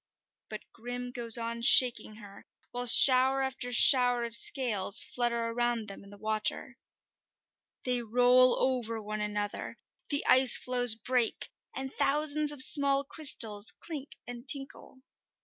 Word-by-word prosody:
But 215 -1 -10
Grim 245 +1 -10
goes 235 -2 +3
on 235 0 -8
shaking 240 -2 +2
her, 205 -2 -17 0.2
while 245 0 -6
shower 260 +2 +6
after 260 -2 -7
shower 245 -1 +4
of 235 -1 -8
scales 225 -7 0
flutter 235 -1 -5
around 240 -1 -5
them 195 - -13
in 200 - -18
the 205 - -17
water. 215 +5 -6 1.0
They 250 -1 -4
roll 245 +2 +1
over 240 -4 -4
one 215 0 -8
another, 205 0 -7 0.3
the 285 -1 -2
ice 260 -1 +2
floes 245 -2 +2
break, 245 0 -5 0.2
and 265 0 -9
thousands 300 +1 -2
of 285 -3 +5
small 280 0 +2
crystals 225 -8 -2
clink 295 -4 -11
and 245 +1 -13
tinkle. 270 -1 -4
245 Hz, 135 wpm, -26 LUFS, 225-265 Hz, 1.0 s, shower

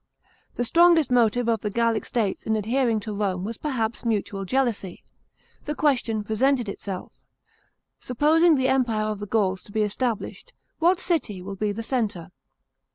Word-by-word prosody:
The 245 - -1
strongest 335 -1 +4
motive 240 0 +3
of 225 -3 +1
the 210 - -2
Gallic 230 +1 0
states 215 -5 -2
in 220 - +2
adhering 230 +1 +1
to 215 0 -5
Rome 195 -3 -1
was 225 +3 -5
perhaps 235 -6 -2
mutual 205 -3 -2
jealousy. 225 -5 -1 0.6
The 300 - -3
question 240 -8 +1
presented 245 +3 +1
itself: 195 -1 -7 0.8
supposing 310 +6 +3
the 260 -1 +1
empire 240 -5 +1
of 215 -1 -3
the 205 - -6
Gauls 195 -3 0
to - - -14
be 215 +1 +1
established, 240 - -3 0.3
what 350 +2 +3
city 310 - -1
will 195 +2 -7
be 210 +2 -1
the 225 +3 -5
centre? 220 -9 -2
225 Hz, 160 wpm, -24 LUFS, 205-260 Hz, 0.8 s, strongest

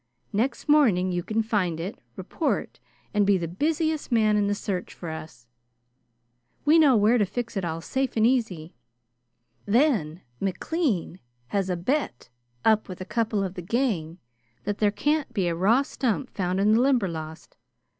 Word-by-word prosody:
Next 235 +10 -1
morning 220 -12 +4
you 175 0 -1
can 220 +5 -1
find 190 -8 0
it, 185 +6 -5 0.2
report, - - -2 0.3
and 205 -1 +3
be 200 -1 +4
the 170 -2 -3
busiest 310 - -1
man 215 -2 +3
in 205 -1 +2
the 205 - 0
search 190 -3 -4
for 170 - -7
us. 155 -6 -9 1.2
We 310 +3 +6
know 280 -6 +6
where 220 +4 +4
to 205 - +3
fix 240 +2 -4
it 195 - -1
all 165 -1 -3
safe 265 +6 -2
and 220 - +4
easy. 220 -10 0 0.9
Then 205 - +2 0.2
McLean 195 - -1 0.3
has 195 -2 -1
a 180 - 0
bet 180 - -2 0.4
up 215 -2 +3
with 185 - -7
a 185 - -5
couple 220 -1 0
of 185 -2 -3
the 185 - -6
gang 180 -6 -1 0.5
that 205 0 -3
there 210 - +4
can't 295 +9 0
be 190 -4 +1
a 170 - 0
raw 210 +10 +3
stump 255 -1 -2
found 185 -1 -1
in 205 +2 +3
the 225 +2 +4
Limberlost. 170 - -1
205 Hz, 165 wpm, -26 LUFS, 180-245 Hz, 1.2 s, We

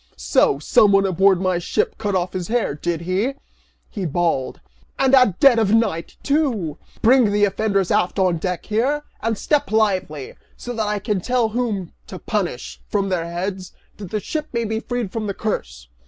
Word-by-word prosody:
"So - - +2
someone 195 +6 +4
aboard 190 0 +3
my 185 -2 0
ship 175 - -1
cut 205 -3 -1
off 180 0 -1
his 180 -2 -3
hair, 235 -8 0
did 165 +3 -3
he?" 190 +10 -1 0.5
he 200 - -6
bawled, 160 -4 -1 0.4
"and 270 0 +2
at 250 -9 +5
dead 260 -4 +6
of 220 -1 +3
night, 205 -8 -1
too! 250 - 0 0.2
Bring 240 -2 +5
the 205 0 +3
offenders 200 -2 0
aft 210 -3 +1
on 180 -4 +2
deck 180 +1 -3
here, 260 +8 0 0.2
and 225 -1 -1
step 295 -3 0
lively, 185 -10 0 0.2
so 245 - -6
that 220 -2 -1
I 210 0 0
can 205 -1 -2
tell 245 +1 +1
whom 215 -6 -2
to 185 - -8
punish, 185 - -3
from 200 -2 0
their 170 -3 -1
heads, 185 +1 -4 0.2
that 200 -4 -8
the 215 - -2
ship 305 +8 -4
may 235 -1 -1
be 220 0 -2
freed 240 -4 -4
from 220 -2 -3
the 200 - -3
curse!" 200 - -4
205 Hz, 185 wpm, -21 LUFS, 180-225 Hz, 0.5 s, dead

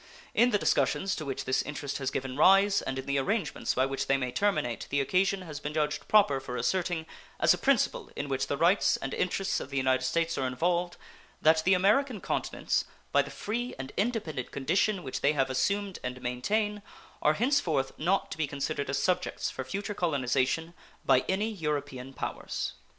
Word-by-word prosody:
In 240 +2 +5
the 210 - +3
discussions 195 -1 +1
to 155 - -5
which 135 -1 -4
this 130 - +2
interest 145 -2 -4
has 135 -1 -1
given 130 -1 -4
rise 195 +6 +5
and 135 0 -4
in 135 - -4
the 140 0 +1
arrangements 195 +4 -1
by 130 - +3
which 135 0 -3
they 135 - +3
may 125 -2 -2
terminate 160 - 0
the 140 - +1
occasion 190 +7 +1
has 155 -4 -7
been 150 +1 -5
judged 150 -1 -1
proper 200 -11 +4
for 125 -2 -6
asserting, 175 -3 0 0.3
as - - +5
a - - -2
principle - - +1
in 145 - -3
which 135 -1 -1
the 140 - -1
rights 175 +6 +3
and 135 - -5
interests 190 +1 0
of - - -7
the 140 - -4
United 130 -1 +2
States 165 +6 0
are 130 - 0
involved, 175 +7 0 0.4
that 160 0 +4
the 190 +1 +5
American 215 +6 +2
continents, - - -1 0.3
by - - +5
the - - -6
free 240 +4 -4
and 135 0 -6
independent 200 - -2
condition 185 +7 0
which 130 - -4
they 145 - +3
have 135 -2 +1
assumed 200 +8 0
and 125 0 -4
maintain, 205 - -1 0.4
are 150 - +4
henceforth 175 - +1
not 185 +5 +1
to - - -6
be 155 - +1
considered 140 0 -3
as 140 - 0
subjects 180 +6 0
for 130 - -5
future 200 +10 -4
colonization 145 -1 0 0.3
by - - +4
any 205 +4 0
European 145 -8 -3
powers. - - -4
155 Hz, 190 wpm, -29 LUFS, 135-195 Hz, 0.4 s, In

